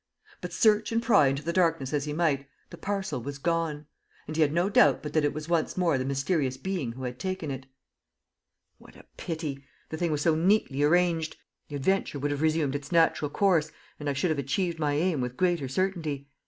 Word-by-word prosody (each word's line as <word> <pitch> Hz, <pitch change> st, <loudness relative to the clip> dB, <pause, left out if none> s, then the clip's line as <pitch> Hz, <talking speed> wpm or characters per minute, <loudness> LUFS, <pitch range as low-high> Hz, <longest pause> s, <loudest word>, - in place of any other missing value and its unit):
But, -, -, -5 dB
search 215 Hz, -1 st, +3 dB
and 230 Hz, -, +2 dB
pry 230 Hz, -, +4 dB
into 135 Hz, +2 st, -1 dB
the 170 Hz, +2 st, -2 dB
darkness 165 Hz, -7 st, +1 dB
as 145 Hz, -1 st, 0 dB
he 150 Hz, -, -3 dB
might, 150 Hz, -4 st, 0 dB, 0.2 s
the -, -, -7 dB
parcel 195 Hz, -9 st, -3 dB
was 140 Hz, +3 st, -6 dB
gone; 160 Hz, -1 st, -1 dB, 0.4 s
and 155 Hz, -, -6 dB
he 160 Hz, -, +1 dB
had 150 Hz, -2 st, +4 dB
no 175 Hz, +4 st, +1 dB
doubt 145 Hz, -9 st, +4 dB
but 150 Hz, -, -5 dB
that 155 Hz, -, +2 dB
it 145 Hz, -, +2 dB
was 155 Hz, 0 st, -6 dB
once 170 Hz, 0 st, 0 dB
more 170 Hz, -7 st, +2 dB
the 130 Hz, -, -2 dB
mysterious 135 Hz, 0 st, 0 dB
being 145 Hz, -6 st, -3 dB
who 130 Hz, +2 st, -8 dB
had 125 Hz, 0 st, -5 dB
taken 185 Hz, -5 st, -3 dB
it. 135 Hz, 0 st, -7 dB, 1.1 s
"What -, -, -17 dB
a -, -, -15 dB
pity! 155 Hz, -4 st, -5 dB, 0.3 s
The 160 Hz, -, -4 dB
thing 170 Hz, 0 st, 0 dB
was 150 Hz, -1 st, -1 dB
so 165 Hz, -, +4 dB
neatly 165 Hz, -4 st, +2 dB
arranged! 165 Hz, +1 st, +2 dB, 0.3 s
The 145 Hz, -, -6 dB
adventure 170 Hz, +2 st, 0 dB
would 145 Hz, +1 st, -1 dB
have 145 Hz, 0 st, -2 dB
resumed 155 Hz, -3 st, +1 dB
its 145 Hz, 0 st, -5 dB
natural 165 Hz, -3 st, +3 dB
course, 165 Hz, -3 st, +2 dB, 0.3 s
and 145 Hz, -1 st, -3 dB
I -, -, 0 dB
should 150 Hz, +5 st, 0 dB
have 155 Hz, -, -1 dB
achieved 165 Hz, +5 st, -1 dB
my 150 Hz, -2 st, +1 dB
aim 160 Hz, -1 st, +1 dB
with 125 Hz, 0 st, -4 dB
greater 175 Hz, -6 st, +1 dB
certainty. 155 Hz, -3 st, -2 dB
155 Hz, 215 wpm, -28 LUFS, 140-175 Hz, 1.1 s, pry